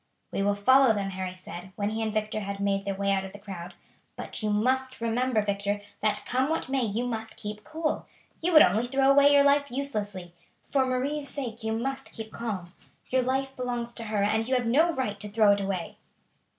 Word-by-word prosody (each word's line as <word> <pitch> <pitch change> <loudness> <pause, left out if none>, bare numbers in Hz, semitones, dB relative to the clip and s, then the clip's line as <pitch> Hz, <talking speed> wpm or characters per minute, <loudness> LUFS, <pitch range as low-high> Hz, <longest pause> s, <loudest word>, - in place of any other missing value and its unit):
"We - - -1
will 200 +1 +2
follow 260 +4 +5
them," 195 -1 -2
Harry 185 -1 -4
said, 185 0 -9
when 205 0 -1
he 220 +1 -2
and 220 -1 -1
Victor 215 0 -1
had 200 -1 -5
made 195 0 0
their 200 -1 -2
way 200 0 0
out 195 -1 +1
of 190 - -8
the - - -8
crowd; 180 -4 -8 0.4
"but - - -6
you 215 - 0
must 260 +5 +1
remember, 230 0 +1
Victor, 200 0 -1 0.2
that, 210 -1 0
come 260 +3 +1
what 320 -4 -1
may, 270 0 +1
you 225 +2 -1
must 225 -2 -4
keep 210 0 -6
cool. 315 +3 -2 0.3
You 350 +2 +1
would 310 - +10
only 220 +6 +2
throw 270 +1 +3
away 280 +1 +6
your 285 -1 +6
life 285 0 +3
uselessly; 205 -10 -3 0.3
for 265 -2 +1
Marie's 280 +3 -1
sake 240 -5 -5
you 220 0 -1
must 270 +3 -4
keep 220 -1 -7
calm. 195 -7 -4 0.4
Your 260 0 +3
life 265 +1 -1
belongs 240 -1 -3
to 230 - -7
her, 210 -2 0
and 220 +2 +1
you 260 - +2
have 250 -1 +1
no 290 +9 +4
right 230 -9 -2
to 210 - -5
throw 210 0 +5
it 200 0 +2
away." 195 -3 -3
220 Hz, 215 wpm, -27 LUFS, 200-260 Hz, 0.4 s, would